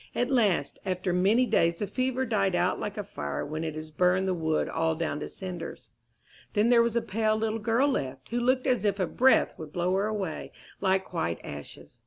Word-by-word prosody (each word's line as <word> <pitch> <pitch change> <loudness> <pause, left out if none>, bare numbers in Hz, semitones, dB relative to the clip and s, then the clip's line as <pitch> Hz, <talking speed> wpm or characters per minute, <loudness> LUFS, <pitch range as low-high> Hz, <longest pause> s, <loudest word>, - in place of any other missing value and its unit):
At 245 +2 0
last, 205 - +2
after 185 -1 -1
many 200 +8 +4
days, 170 -7 +2
the 205 - -2
fever 255 +3 -1
died 200 -5 +1
out 180 +1 +1
like 205 0 -4
a 210 - -2
fire 70 - -4
when 155 +2 -4
it 155 -1 -3
has 155 0 -7
burned 180 +4 +2
the 185 - +1
wood 160 -2 0
all 160 0 0
down 155 -2 -2
to - - -5
cinders. 185 -2 -7 0.6
Then 215 +2 +3
there 240 -1 +6
was 235 -1 +1
a 235 - +1
pale 215 +2 +1
little 220 0 -1
girl 230 +6 +2
left, 135 - -3
who 240 - -1
looked 255 +1 +2
as 250 -6 +2
if 200 -1 +1
a 185 - +2
breath 260 +9 +3
would 155 -2 -8
blow 175 +2 0
her 195 +2 +1
away 200 -6 -4 0.3
like 190 0 0
white 85 - -1
ashes. 75 0 -9
190 Hz, 215 wpm, -28 LUFS, 165-225 Hz, 0.6 s, there